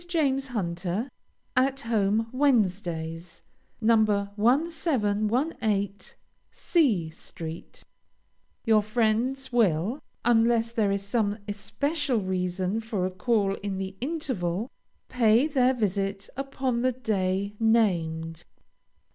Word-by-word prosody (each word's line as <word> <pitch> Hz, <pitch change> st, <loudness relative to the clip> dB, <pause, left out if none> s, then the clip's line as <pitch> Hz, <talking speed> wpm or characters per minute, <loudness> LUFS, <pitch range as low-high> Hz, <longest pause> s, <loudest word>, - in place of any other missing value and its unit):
JAMES 275 Hz, -6 st, +1 dB
HUNTER. 190 Hz, +1 st, -3 dB, 0.4 s
AT 265 Hz, +2 st, +2 dB
HOME 220 Hz, -1 st, +1 dB
WEDNESDAYS. 180 Hz, -, 0 dB, 0.4 s
No. 225 Hz, 0 st, +5 dB, 0.4 s
1718 225 Hz, -, 0 dB, 0.3 s
C 220 Hz, -, +1 dB
st. 165 Hz, -, -9 dB, 0.8 s
Your 220 Hz, -1 st, +5 dB
friends 235 Hz, +5 st, 0 dB
will, 215 Hz, -, +2 dB, 0.3 s
unless 230 Hz, -1 st, +3 dB
there 215 Hz, -4 st, +1 dB
is 200 Hz, 0 st, -1 dB
some 205 Hz, 0 st, 0 dB
especial 280 Hz, +7 st, -1 dB
reason 185 Hz, +1 st, -1 dB
for 220 Hz, -5 st, -2 dB
a 185 Hz, -, -2 dB
call 195 Hz, +1 st, +1 dB
in 200 Hz, -1 st, -4 dB
the 190 Hz, 0 st, -4 dB
interval, 240 Hz, -, -2 dB, 0.4 s
pay 235 Hz, +1 st, +4 dB
their 260 Hz, -4 st, +2 dB
visit 195 Hz, -3 st, -2 dB
upon 265 Hz, -2 st, -2 dB
the 255 Hz, 0 st, +2 dB
day 200 Hz, -4 st, -1 dB
named. 170 Hz, -8 st, +1 dB
220 Hz, 95 wpm, -27 LUFS, 195-255 Hz, 0.8 s, No